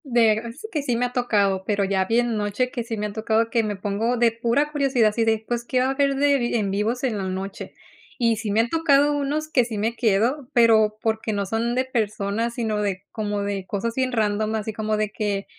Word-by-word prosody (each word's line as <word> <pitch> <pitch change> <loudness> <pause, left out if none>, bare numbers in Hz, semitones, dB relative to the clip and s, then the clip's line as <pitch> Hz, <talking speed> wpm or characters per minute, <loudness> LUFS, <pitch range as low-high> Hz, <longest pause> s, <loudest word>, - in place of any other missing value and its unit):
De 235 -5 +4
a - - -6
mí 230 - -7
sí 310 - -9
que 305 - -1
sí 250 -4 -1
me 245 +2 +1
ha 245 - -5
tocado, 200 -6 +1
pero 205 -1 0
ya 190 -1 +1
bien 235 +2 +1
noche 210 +4 -1
que 240 - -3
sí 225 -1 -5
me 210 - -2
han 210 - -5
tocado, 220 +1 0
que 235 - +3
me 210 -1 -2
pongo 205 +5 -1
de 235 -1 +4
pura 235 +6 0
curiosidad, 270 -6 +2
así 225 +2 0
de, 220 -1 +1
pues, 240 -1 -2
¿qué 255 +1 0
va 255 - +2
a - - 0
haber 275 0 +1
de 280 0 +3
vi 240 -1 -1
en 205 -4 0
vivos 220 +6 -1
en 230 -6 0
la - - -3
noche? 190 +1 -5 0.4
Y 230 -2 +2
sí 220 0 -4
me 210 +3 +3
han 230 - -2
tocado 295 -2 +3
unos 290 +2 -1
que 250 - +4
sí 230 -2 -5
me 225 +3 -1
quedo, 240 +5 +1
pero 220 -3 +4
porque 220 -1 -1
no 200 -1 -1
son 225 +4 -1
de 255 +1 +1
personas, 225 -1 -2
sino 220 -3 -1
de 195 -2 -2
como 205 -2 -2
de 200 -2 -3
cosas 220 +3 -2
bien 260 -1 0
random, 215 -1 0
así 220 0 -3
como 215 0 -1
de 215 -1 0
que 200 -2 -2
225 Hz, 250 wpm, -23 LUFS, 210-245 Hz, 0.4 s, De